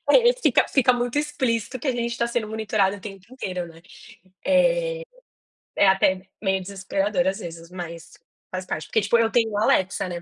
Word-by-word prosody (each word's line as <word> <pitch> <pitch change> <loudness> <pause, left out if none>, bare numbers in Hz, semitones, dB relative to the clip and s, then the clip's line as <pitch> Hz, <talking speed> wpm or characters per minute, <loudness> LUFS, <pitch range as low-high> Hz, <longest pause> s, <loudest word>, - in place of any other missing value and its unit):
É, 485 0 +6
fica, - - +4
fica 255 -2 +4
muito 245 +2 -1
explícito 255 -5 -1
que 275 - -3
a - - +3
gente 235 -1 -2
tá 235 - +2
sendo 235 -2 -2
monitorado 215 -2 0
o - - -13
tempo 195 -2 -10
inteiro, 185 -8 -4
né? 165 -1 -14 0.6
É, - - +2 0.7
é 200 - +5
até 190 -1 +3 0.2
meio 190 -2 +1
desesperador 195 +5 -1
às 190 +1 0
vezes, 165 0 -8
mas 170 -2 -8 0.4
faz 185 0 -4
parte. 155 -4 -4
Porque, 220 - +1
tipo, 205 +3 +3
eu 225 -1 +2
tenho 225 -3 +1
a 210 - +2
Alexa, 190 -2 +2
né, 175 -1 -5
210 Hz, 190 wpm, -24 LUFS, 190-245 Hz, 0.7 s, É